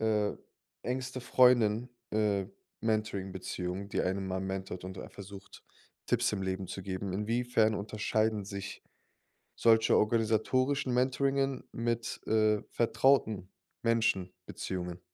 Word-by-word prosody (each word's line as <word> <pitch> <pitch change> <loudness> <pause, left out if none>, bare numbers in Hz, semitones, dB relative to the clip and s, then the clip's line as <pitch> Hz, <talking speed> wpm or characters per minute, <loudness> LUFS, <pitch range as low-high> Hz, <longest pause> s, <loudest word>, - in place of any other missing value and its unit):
äh 105 -2 +2 0.5
engste 130 0 -3
Freundin, 120 -2 +4 0.2
äh, 105 -3 +1 0.3
Mentoring-Beziehung, 95 -3 -2
die - - 0
einem 95 +1 -1
mal 95 0 -2
mentort 95 -1 -4
und 95 0 -7
ein - - -7
versucht, 100 0 -11 0.4
Tipps - - +2
im 95 - -2
Leben 95 0 -2
zu 95 - -6
geben. 95 0 -4
Inwiefern 110 +1 +2
unterscheiden 110 0 0
sich 100 -1 -6 0.7
solche 115 -1 +5
organisatorischen 120 +5 +2
Mentoringen 135 +1 +1
mit, 115 0 -2
äh, 110 -1 +3
vertrauten 110 -6 +2 0.3
Menschen-Beziehungen? 90 -5 -1
105 Hz, 105 wpm, -31 LUFS, 95-115 Hz, 0.7 s, solche